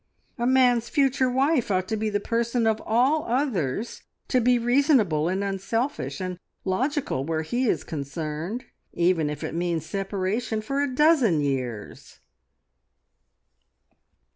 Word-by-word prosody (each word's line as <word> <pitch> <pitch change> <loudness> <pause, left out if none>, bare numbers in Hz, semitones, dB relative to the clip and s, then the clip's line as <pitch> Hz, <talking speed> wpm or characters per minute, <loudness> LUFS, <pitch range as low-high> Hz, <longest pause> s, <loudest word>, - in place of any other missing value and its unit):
A 240 - +1
man's 245 -3 +3
future 270 -2 +2
wife 265 0 +1
ought 185 -1 0
to 220 - 0
be 215 0 -1
the 205 -1 0
person 235 +2 0
of 220 -1 +1
all 260 +7 +3
others 230 - -1 0.3
to 255 - +3
be 245 +1 +4
reasonable, 240 - +2
and 190 +2 -1
unselfish, 195 - -2
and 185 -1 -4 0.3
logical 255 - -1
where 160 +1 -2
he 240 +10 -1
is - - 0
concerned, 155 - -5 0.3
even 170 -3 +2
if 150 - -5
it - - -4
means 170 -2 -1
separation 200 +3 -2
for 275 +6 -2
a 285 -2 0
dozen 255 - +4
years." 130 -6 -4
215 Hz, 135 wpm, -25 LUFS, 170-255 Hz, 0.3 s, be